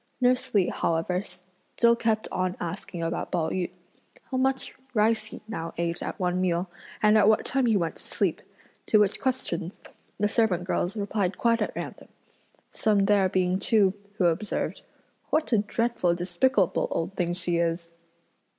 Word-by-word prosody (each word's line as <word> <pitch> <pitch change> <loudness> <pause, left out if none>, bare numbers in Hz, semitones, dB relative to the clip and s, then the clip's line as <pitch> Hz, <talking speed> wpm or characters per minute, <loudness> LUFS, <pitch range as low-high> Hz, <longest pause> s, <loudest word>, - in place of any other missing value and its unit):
Nurse 250 0 +2
Li 190 -3 +4
however 170 +2 0
still 185 +5 -1
kept 225 -2 0
on 185 -1 -1
asking 175 0 -5
about 165 +1 -3
Pao 165 -3 0
yü, 185 -1 -1 0.6
"How 260 - 0
much 265 +1 0 0.2
rice 215 0 +3
he 220 - -9
now 165 -7 -5
ate 170 0 -1
at - - -5
one 180 0 0
meal? 180 0 0 0.4
and 215 0 +6
at 205 - +5
what 220 0 +4
time 265 -2 +1
he 220 -3 +4
went 170 -3 -2
to - - -14
sleep?" - - -1 0.5
to 215 - +5
which 205 -1 +2
questions, 200 -9 -2 0.4
the 210 - +3
servant 205 -5 +1
girls 180 +2 -1
replied 200 -2 -1
quite 230 -1 +2
at - - -2
random; - - -6 0.6
some 205 -3 +2
there 200 -2 +4
being 185 0 +1
too 200 -3 +3 0.2
who 190 - +1
observed: 175 +5 -1 0.5
"What 310 -2 +1
a 220 - +5
dreadful 210 -4 0
despicable 180 +4 +1
old 170 +4 -2
thing 175 -2 0
she 175 -1 0
is!" 170 0 -1
190 Hz, 165 wpm, -27 LUFS, 175-220 Hz, 0.6 s, and